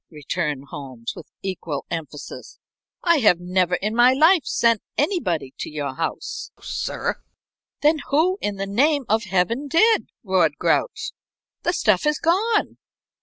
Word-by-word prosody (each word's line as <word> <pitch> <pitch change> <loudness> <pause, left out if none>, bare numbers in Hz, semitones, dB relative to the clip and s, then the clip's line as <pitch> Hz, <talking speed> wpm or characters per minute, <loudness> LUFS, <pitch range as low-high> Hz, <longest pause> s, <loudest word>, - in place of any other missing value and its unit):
_" - - -67
returned 150 -2 -3
Holmes, 130 -6 -7
with - - -11
equal 170 -6 -4
emphasis. 155 -4 -7 0.5
"I 340 -2 +4
have 210 - +4
never 180 0 +1
in 210 +4 -2
my 245 +2 +6
life 320 +4 +5
sent 230 -2 +2 0.2
anybody 180 - 0
to - - -4
your 145 -3 -4
house, - - -4
sir." - - -3 0.6
"Then 305 +1 +4
who 345 +7 +2
in 205 -1 -2
the 195 0 -3
name 275 +8 +2
of 220 +1 +1
Heaven 200 +9 0
did?" 435 - +3
roared 180 -7 +2
Grouch. 445 -2 0 0.5
"The 345 - 0
stuff 215 - +2
is 300 0 +2
gone." 415 +7 +1
210 Hz, 145 wpm, -23 LUFS, -, 0.6 s, my